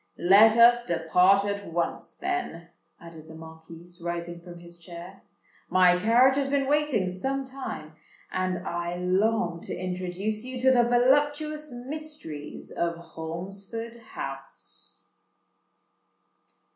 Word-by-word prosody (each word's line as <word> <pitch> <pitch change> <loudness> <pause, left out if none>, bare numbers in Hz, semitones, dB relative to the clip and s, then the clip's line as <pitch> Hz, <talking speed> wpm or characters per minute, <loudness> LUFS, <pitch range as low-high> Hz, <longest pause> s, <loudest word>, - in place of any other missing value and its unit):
"Let 210 +5 +6
us 240 +1 +7
depart 180 +3 +3
at 200 -3 -4
once, 170 0 -3
then," 360 - -4 0.3
added 165 -2 -12
the 160 - -11
Marquis, 160 +1 -12 0.2
rising 170 0 -4
from 175 0 -11
his 170 0 -13
chair: 175 +2 -11 0.5
"my 180 -1 +5
carriage 245 +6 +5
has 275 -1 0
been 275 -1 +1
waiting 285 -8 +1
some 265 +10 -2
time; 255 - -7 0.4
and 185 -1 -1
I 175 0 -3
long 180 -1 +1
to - - -4
introduce 185 +4 -3
you 255 0 -6
to 260 0 +5
the 250 -2 +5
voluptuous 290 +5 +2
mysteries 250 - -7
of 170 0 -1 0.2
Holmesford 195 +8 -6 0.2
House." 135 0 -8
190 Hz, 120 wpm, -27 LUFS, 170-250 Hz, 0.5 s, us